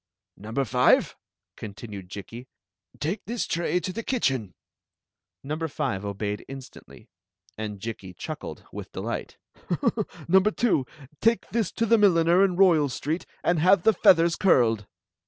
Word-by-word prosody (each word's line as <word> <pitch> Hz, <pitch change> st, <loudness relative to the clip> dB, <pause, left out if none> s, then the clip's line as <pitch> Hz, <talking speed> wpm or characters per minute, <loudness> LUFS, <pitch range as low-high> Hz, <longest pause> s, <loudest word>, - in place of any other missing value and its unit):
"Number 110 Hz, +7 st, -3 dB
five," 125 Hz, +1 st, +3 dB, 0.4 s
continued 100 Hz, -3 st, -9 dB
Jikki, 115 Hz, +6 st, -9 dB, 0.5 s
"take 170 Hz, +8 st, -2 dB
this 235 Hz, +1 st, -2 dB
tray 170 Hz, +1 st, 0 dB
to 185 Hz, -, -4 dB
the 230 Hz, -, -4 dB
kitchen:" 135 Hz, -, -1 dB, 0.9 s
Number 155 Hz, +4 st, -3 dB
five 100 Hz, -9 st, -3 dB
obeyed 100 Hz, +1 st, -3 dB
instandy, 135 Hz, -1 st, -11 dB, 0.5 s
and 105 Hz, -2 st, -5 dB
Jikki 95 Hz, -4 st, -7 dB
chuckled -, -, -7 dB
with -, -, -8 dB
delight -, -, -5 dB, 0.5 s
" -, -, -2 dB
Number 190 Hz, +4 st, +5 dB
two, 210 Hz, -, +1 dB, 0.3 s
take 230 Hz, +1 st, +2 dB
this 225 Hz, -5 st, 0 dB
to 230 Hz, -, 0 dB
the 230 Hz, 0 st, +4 dB
milliner 175 Hz, -2 st, +5 dB
in 190 Hz, -2 st, +2 dB
Royal 170 Hz, -6 st, +4 dB
Street, 155 Hz, +7 st, -3 dB, 0.2 s
and 175 Hz, -2 st, +2 dB
have 180 Hz, +2 st, +4 dB
the 220 Hz, -, +5 dB
feathers 170 Hz, -2 st, +5 dB
curled." 115 Hz, -, +3 dB
155 Hz, 140 wpm, -26 LUFS, -, 0.9 s, Number